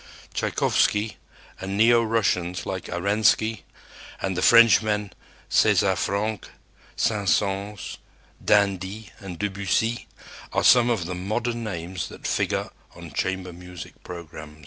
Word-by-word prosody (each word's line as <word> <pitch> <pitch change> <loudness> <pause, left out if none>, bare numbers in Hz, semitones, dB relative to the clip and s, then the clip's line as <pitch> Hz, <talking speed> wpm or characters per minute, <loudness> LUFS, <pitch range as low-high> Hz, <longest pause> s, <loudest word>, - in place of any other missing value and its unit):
Tschaikowsky 105 +1 +1 0.4
and 95 +1 -4
neo 115 +2 +5
Russians 95 -6 0
like 95 -2 -4
Arensky, 105 +4 +1 0.6
and 95 -1 -2
the 90 - -1
Frenchmen, 105 -4 +5 0.3
César - - +3
Franck, 105 +2 -2 0.5
Saint 105 -3 0
Saëns, 100 0 -1 0.5
d'Indy 100 +1 +1
and 95 -3 -8
Debussy, 100 +4 -1 0.5
are - - +1
some 120 -1 +6
of 110 -8 0
the 90 - -4
modern 115 +6 -2
names 90 -3 -4
that - - -12
figure - - -1 0.2
on - - -10
chamber 95 -1 -2
music 90 -1 -11
programs. 80 -3 -9
100 Hz, 115 wpm, -24 LUFS, 90-110 Hz, 0.6 s, some